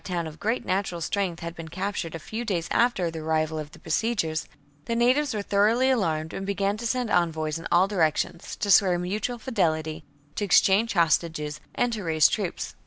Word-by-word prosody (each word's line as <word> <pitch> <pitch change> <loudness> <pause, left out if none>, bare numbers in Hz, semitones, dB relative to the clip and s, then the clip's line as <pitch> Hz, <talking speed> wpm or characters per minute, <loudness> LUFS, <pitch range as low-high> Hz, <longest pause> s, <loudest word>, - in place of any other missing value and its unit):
town 175 -3 -2
of 155 0 -9
great 225 +4 -1
natural 185 -2 -1
strength 175 0 -2
had 170 0 -5
been 165 -1 -8
captured 185 -1 -4
a - - -5
few 220 +9 -5
days 180 -7 -2
after 215 -8 +2
the 165 - -6
arrival 155 0 -1
of 150 -1 -6
the 170 - -15
besiegers, 165 -3 -1 0.4
the 230 - -1
natives 255 +5 +3
were 205 - -2
thoroughly 220 +7 +3
alarmed 160 -9 0
and 195 - -4
began 200 +1 0
to 235 +2 -4
send 250 -1 -1
envoys 160 -2 0
in 165 - -6
all 180 +2 +5
directions, 170 -3 -1
to 205 - -1
swear 185 -2 +5
mutual 205 +7 -2
fidelity, 160 -9 -1 0.3
to - - -3
exchange 200 +3 +4
hostages, 160 -3 +1 0.2
and 245 -1 +1
to 215 -3 -4
raise 160 -3 +4
troops. - - -3
180 Hz, 190 wpm, -26 LUFS, 160-210 Hz, 0.4 s, all